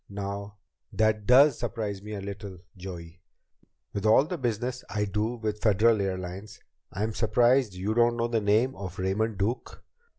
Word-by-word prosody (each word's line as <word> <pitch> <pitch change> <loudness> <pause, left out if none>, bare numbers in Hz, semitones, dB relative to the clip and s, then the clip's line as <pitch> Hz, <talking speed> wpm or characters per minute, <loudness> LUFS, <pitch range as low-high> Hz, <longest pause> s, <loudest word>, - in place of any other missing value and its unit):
"Now 100 0 -5 0.4
that 110 -2 +1
does 135 +2 +6
surprise 110 -4 -3
me 105 +1 -8
a 100 - -5
little, 100 -1 -7 0.2
Joey. 90 -2 -9 0.7
With 100 - -3
all 110 +6 +5
the 180 - -4
business 125 -2 -2
I 105 +1 -1
do 105 +4 -1
with 110 -2 -4
Federal 110 0 +4
Airlines, 95 +1 -5 0.3
I'm 105 +4 -2
surprised 120 0 +2
you 95 +4 -2
don't 120 +1 +3
know 115 0 0
the 115 -2 0
name 110 +6 +2
of 95 -2 -7
Raymond 100 +3 -1
Duke." 105 +6 -3
105 Hz, 160 wpm, -27 LUFS, 100-115 Hz, 0.7 s, does